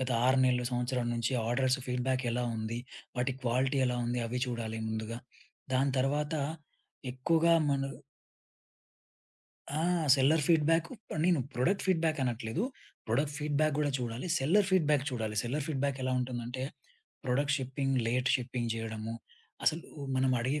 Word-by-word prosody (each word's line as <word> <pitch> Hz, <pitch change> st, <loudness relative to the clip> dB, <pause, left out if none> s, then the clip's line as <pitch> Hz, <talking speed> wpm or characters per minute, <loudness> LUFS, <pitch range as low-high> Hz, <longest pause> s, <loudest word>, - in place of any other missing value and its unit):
గత 130 Hz, 0 st, -1 dB, 0.2 s
6 130 Hz, +1 st, +4 dB
నెలలు 125 Hz, -1 st, +2 dB
సంవత్సరం 125 Hz, 0 st, -1 dB
నుంచి 115 Hz, +2 st, -1 dB, 0.2 s
ఆర్డర్స్ 130 Hz, +2 st, +2 dB
ఫీడ్‌బ్యాక్ 125 Hz, +1 st, 0 dB
ఎలా 125 Hz, +1 st, 0 dB
ఉంది? 110 Hz, +1 st, -3 dB, 0.4 s
వాటి 125 Hz, +1 st, 0 dB
క్వాలిటీ 130 Hz, +3 st, +2 dB
ఎలా 125 Hz, -, 0 dB
ఉంది? 120 Hz, +1 st, -1 dB
అవి 125 Hz, +2 st, -2 dB
చూడాలి 115 Hz, -2 st, -3 dB
ముందుగా. 110 Hz, +1 st, -3 dB, 0.6 s
దాని 135 Hz, +1 st, +2 dB
తర్వాత 145 Hz, +4 st, +1 dB, 0.8 s
ఎక్కువగా 165 Hz, +6 st, +3 dB, 0.2 s
మన 140 Hz, -1 st, +1 dB, 1.9 s
ఆ! 150 Hz, +2 st, -1 dB, 0.3 s
సెల్లర్ 145 Hz, +3 st, +4 dB
ఫీడ్‌బ్యాకు 165 Hz, 0 st, +3 dB, 0.3 s
నేను 175 Hz, -5 st, +4 dB
ప్రొడక్ట్ 150 Hz, +12 st, +1 dB
ఫీడ్‌బ్యాక్ 165 Hz, -4 st, +2 dB
అనట్లేదు. 120 Hz, -, -1 dB, 0.4 s
ప్రోడక్ట్ 140 Hz, +6 st, 0 dB
ఫీడ్‌బ్యాక్ 150 Hz, 0 st, +1 dB
గూడా 150 Hz, -1 st, +2 dB
చూడాలి. 120 Hz, +4 st, -4 dB
సెల్లర్ 185 Hz, +9 st, +3 dB
ఫీడ్‌బ్యాక్ 150 Hz, -7 st, +3 dB
చూడాలి. 110 Hz, -3 st, -3 dB
సెల్లర్ 135 Hz, +5 st, -2 dB
ఫీడ్‌బ్యాక్ 140 Hz, -3 st, -1 dB
ఎలా 130 Hz, 0 st, 0 dB
ఉంటుందంటే 125 Hz, 0 st, -4 dB, 0.6 s
ప్రొడక్ట్ 140 Hz, +3 st, +2 dB
షిప్పింగ్ 135 Hz, +1 st, -1 dB
లేట్ 125 Hz, +2 st, +1 dB
షిప్పింగ్ 125 Hz, -2 st, -3 dB
జేయడము, 115 Hz, 0 st, -4 dB, 0.5 s
అసలు 160 Hz, +2 st, +2 dB, 0.3 s
మనం 130 Hz, 0 st, +3 dB
అడిగే 135 Hz, +5 st, 0 dB
130 Hz, 135 wpm, -31 LUFS, 120-145 Hz, 1.9 s, 6